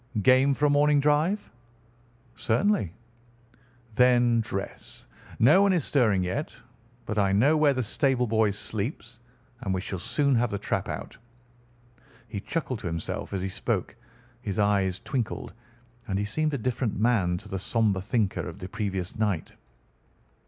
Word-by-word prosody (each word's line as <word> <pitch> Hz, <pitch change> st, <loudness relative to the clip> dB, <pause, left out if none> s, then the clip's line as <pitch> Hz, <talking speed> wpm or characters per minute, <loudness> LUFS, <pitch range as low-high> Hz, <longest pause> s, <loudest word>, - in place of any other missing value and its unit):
"Game 130 Hz, +3 st, +5 dB
for 150 Hz, -, +1 dB
a -, -, +4 dB
morning 145 Hz, 0 st, +4 dB
drive?" 150 Hz, +8 st, +1 dB, 0.8 s
"Certainly." 120 Hz, -, +1 dB, 1.0 s
"Then 120 Hz, 0 st, +4 dB
dress. 100 Hz, -3 st, -6 dB, 0.3 s
No 150 Hz, -, +6 dB
one 200 Hz, -1 st, +4 dB
is 170 Hz, -6 st, +1 dB
stirring 110 Hz, -9 st, +2 dB
yet, 120 Hz, +12 st, -3 dB, 0.5 s
but 110 Hz, -2 st, -2 dB
I 100 Hz, -1 st, +3 dB
know 135 Hz, +10 st, +4 dB
where 150 Hz, -3 st, +3 dB
the 130 Hz, -, 0 dB
stable 125 Hz, +2 st, +1 dB
boy 110 Hz, -1 st, +2 dB
sleeps, 110 Hz, +3 st, -4 dB, 0.4 s
and 120 Hz, -7 st, -3 dB
we -, -, -1 dB
shall 95 Hz, -1 st, -5 dB
soon 140 Hz, -, +1 dB
have 120 Hz, -1 st, +2 dB
the 100 Hz, -, -2 dB
trap -, -, -2 dB
out." -, -, -6 dB, 1.1 s
He 105 Hz, -3 st, -5 dB
chuckled 130 Hz, -, -3 dB
to 100 Hz, -, -5 dB
himself 80 Hz, -1 st, -4 dB
as 95 Hz, -2 st, -2 dB
he 95 Hz, -, -2 dB
spoke, 105 Hz, 0 st, -2 dB, 0.5 s
his 100 Hz, -5 st, -4 dB
eyes 100 Hz, -2 st, +2 dB
twinkled, 125 Hz, -6 st, -3 dB, 0.5 s
and 95 Hz, -2 st, -1 dB
he 100 Hz, -, -1 dB
seemed 155 Hz, +8 st, 0 dB
a -, -, -1 dB
different 125 Hz, -2 st, -2 dB
man 105 Hz, -6 st, +2 dB
to -, -, -10 dB
the 95 Hz, -, -4 dB
sombre 105 Hz, -2 st, +1 dB
thinker 105 Hz, -3 st, -1 dB
of 80 Hz, -, -10 dB
the 90 Hz, -, -7 dB
previous 95 Hz, -4 st, -3 dB
night. 100 Hz, -7 st, -1 dB
115 Hz, 155 wpm, -27 LUFS, 100-135 Hz, 1.1 s, No